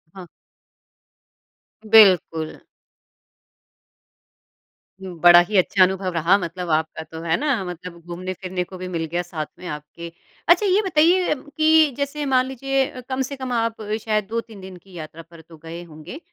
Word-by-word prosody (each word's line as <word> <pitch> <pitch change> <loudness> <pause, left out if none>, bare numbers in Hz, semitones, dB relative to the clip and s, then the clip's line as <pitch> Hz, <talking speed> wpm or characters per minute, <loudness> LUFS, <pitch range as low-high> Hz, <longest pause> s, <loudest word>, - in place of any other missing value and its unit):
हाँ। 185 -2 -10 1.6
बिल्कुल। 185 -7 +4 2.4
बड़ा 175 -2 +5
ही 210 - 0
अच्छा 185 +1 +4
अनुभव 185 0 0
रहा 170 +4 +3
मतलब 180 -1 -5
आपका 160 0 -1
तो, 160 +1 -10
है 165 0 0
ना? 275 -9 0
मतलब 180 0 -8
घूमने-फिरने 185 +1 -5
को 185 +1 -11
भी 185 0 -6
मिल 165 -2 -3
गया 175 - 0
साथ 170 -3 -5
में 180 - -8
आपके। 150 +3 -8 0.4
अच्छा 355 +4 +5
ये 395 +2 +3
बताइए 350 +2 +3 0.2
कि 315 -1 +5
जैसे 285 +1 -3
मान 260 -2 +2
लीजिए 270 +1 -1
अ, 255 - -10
कम 260 0 -1
से 270 +2 -4
कम 260 -1 -6
आप 230 -1 -1 0.2
शायद 215 -2 0
2-3 225 -2 -5
दिन 185 -1 -10
की 185 +1 -20
यात्रा 160 -1 -9
पर 165 0 -16
तो 165 0 -16
गए 165 +2 -9
होंगे, 160 - -11
185 Hz, 155 wpm, -22 LUFS, 170-255 Hz, 2.4 s, बड़ा